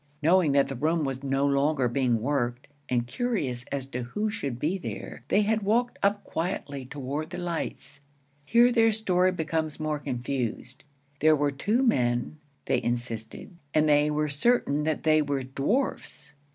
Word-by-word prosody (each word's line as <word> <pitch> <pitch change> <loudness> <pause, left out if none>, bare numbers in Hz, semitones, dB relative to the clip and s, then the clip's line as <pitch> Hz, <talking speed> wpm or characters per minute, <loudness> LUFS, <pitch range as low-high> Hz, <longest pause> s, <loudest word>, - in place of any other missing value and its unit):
Knowing 170 -1 +4
that 140 -1 +4
the 135 - -5
room 155 +5 +1
was 135 -1 -3
no 135 0 +1
longer 140 -1 +2
being 120 -2 +1
worked, 125 -3 -1 0.2
and 120 -1 +1
curious 130 - -2
as 140 -2 -2
to 125 -2 -5
who 210 - -2
should 140 - -4
be 155 +9 0
there, 190 - -7
they 210 - +3
had 220 +1 +1
walked 235 +4 +1
up 200 +1 +1
quietly 155 -5 -3
toward 145 +3 -4
the 180 - -6
lights. 170 -4 -4 0.4
Here 235 +10 +5
their 225 -2 +4
story 185 -4 +2
became 160 -2 -1
more 155 -1 -1
confused. 125 0 -4 0.3
There 155 +1 +5
were 145 -1 +1
two 210 - 0
men, 125 - +1 0.3
they - - +1
insisted, 120 - -4 0.2
and 155 0 +4
they 150 0 +4
were 150 0 0
certain 150 -2 +1
that 155 -1 -1
they 155 -1 +4
were 140 -2 -1
dwarfs. 150 - -2
150 Hz, 165 wpm, -27 LUFS, 135-180 Hz, 0.4 s, Here